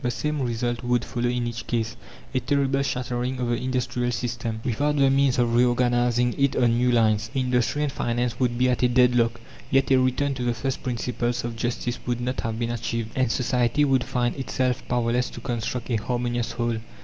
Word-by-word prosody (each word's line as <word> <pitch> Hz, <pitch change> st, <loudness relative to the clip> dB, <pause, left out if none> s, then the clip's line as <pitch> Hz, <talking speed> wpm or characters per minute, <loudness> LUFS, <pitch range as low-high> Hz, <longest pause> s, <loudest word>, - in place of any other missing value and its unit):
The 125 Hz, -, +1 dB
same 150 Hz, +5 st, -2 dB
result 120 Hz, -1 st, -1 dB
would 120 Hz, -1 st, +1 dB
follow 120 Hz, 0 st, -1 dB
in 120 Hz, 0 st, -1 dB
each 120 Hz, 0 st, -5 dB
case 115 Hz, -1 st, -1 dB, 0.4 s
a 130 Hz, -, +2 dB
terrible 140 Hz, 0 st, +1 dB
shattering 125 Hz, -1 st, -2 dB
of 125 Hz, -1 st, -1 dB
the 120 Hz, -, +1 dB
industrial 125 Hz, -1 st, -1 dB
system, 115 Hz, -2 st, -3 dB
without 145 Hz, +5 st, +1 dB
the 135 Hz, -2 st, +4 dB
means 135 Hz, -1 st, +3 dB
of 120 Hz, -1 st, +2 dB
reorganizing 120 Hz, 0 st, +2 dB
it 140 Hz, -1 st, +2 dB
on 120 Hz, -2 st, +3 dB
new 125 Hz, +1 st, +2 dB
lines. 110 Hz, -2 st, +2 dB
Industry 125 Hz, +2 st, +1 dB
and 145 Hz, -, 0 dB
finance 120 Hz, -1 st, -1 dB
would 120 Hz, -2 st, +1 dB
be 125 Hz, +1 st, +3 dB
at 125 Hz, -1 st, +1 dB
a 125 Hz, -, +5 dB
deadlock, 120 Hz, -1 st, +3 dB, 0.3 s
yet 135 Hz, 0 st, +2 dB
a 130 Hz, -, +6 dB
return 130 Hz, +2 st, +1 dB
to 125 Hz, -2 st, -4 dB
the 120 Hz, -1 st, 0 dB
first 135 Hz, +3 st, -3 dB
principles 120 Hz, -1 st, -2 dB
of 120 Hz, -1 st, -4 dB
justice 120 Hz, +1 st, -2 dB
would 120 Hz, -1 st, 0 dB
not 125 Hz, +1 st, -2 dB
have 115 Hz, -1 st, -3 dB
been 120 Hz, 0 st, -1 dB
achieved, 115 Hz, -1 st, -3 dB
and 130 Hz, -3 st, +1 dB
society 125 Hz, +3 st, +2 dB
would 135 Hz, -2 st, +2 dB
find 120 Hz, -1 st, -1 dB
itself 130 Hz, -2 st, -1 dB
powerless 120 Hz, 0 st, +1 dB
to -, -, -9 dB
construct 120 Hz, 0 st, -3 dB
a 115 Hz, -, +2 dB
harmonious 120 Hz, +1 st, -2 dB
whole. 120 Hz, -1 st, -1 dB
120 Hz, 200 wpm, -25 LUFS, 120-130 Hz, 0.4 s, a